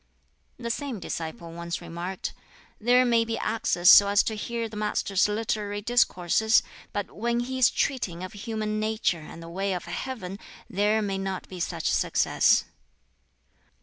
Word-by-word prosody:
The 235 -1 -3
same 265 -3 -4
disciple 165 +1 -5
once 170 +1 -4
remarked, 175 +2 -5 0.5
"There 245 +3 +4
may 235 -2 +3
be 230 0 -3
access 180 -5 0
so 200 +1 +10
as 205 +1 +4
to 220 - -2
hear 230 +2 -3
the 220 - -11
Master's 210 -2 +1
literary 210 -1 -2
discourses, 220 -2 +3 0.3
but 205 -1 -3
when 235 +2 0
he 260 +2 -4
is 250 - +6
treating 190 -11 -1
of 185 - -7
human 215 0 -3
nature 215 -6 0
and 165 +2 -10
the - - -9
way 195 +3 -2
of 180 - -4
Heaven, 205 -8 -5 0.3
there 210 +2 +1
may 195 -1 -2
not 190 -1 -4
be 185 - -9
such - - -1
success." - - +3
210 Hz, 155 wpm, -26 LUFS, 185-230 Hz, 0.5 s, so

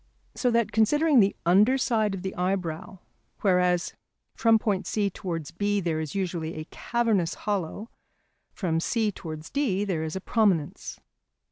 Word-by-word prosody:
So 250 - 0
that 230 -3 +1
considering 290 +7 +4
the 200 -2 +3
under 205 +9 +5
side 220 -6 +1
of 185 - -7
the 190 - -3
eyebrow, 180 -1 -2 0.4
whereas 180 -3 +2 0.4
from 225 -1 +4
point 205 -3 -1
C 205 -2 0
towards 165 -4 -5
B 205 +4 0
there 165 -4 -1
is 155 +1 -5
usually 170 -4 -2
a 155 0 -6
cavernous 225 -8 0
hollow, 205 +1 -3 0.6
from 165 -5 -1
C 220 +4 0
towards 155 -4 -8
D 205 -9 0
there 180 -6 -1
is 160 +1 -4
a - - -2
prominence. 190 -7 0
195 Hz, 150 wpm, -26 LUFS, 170-220 Hz, 0.6 s, under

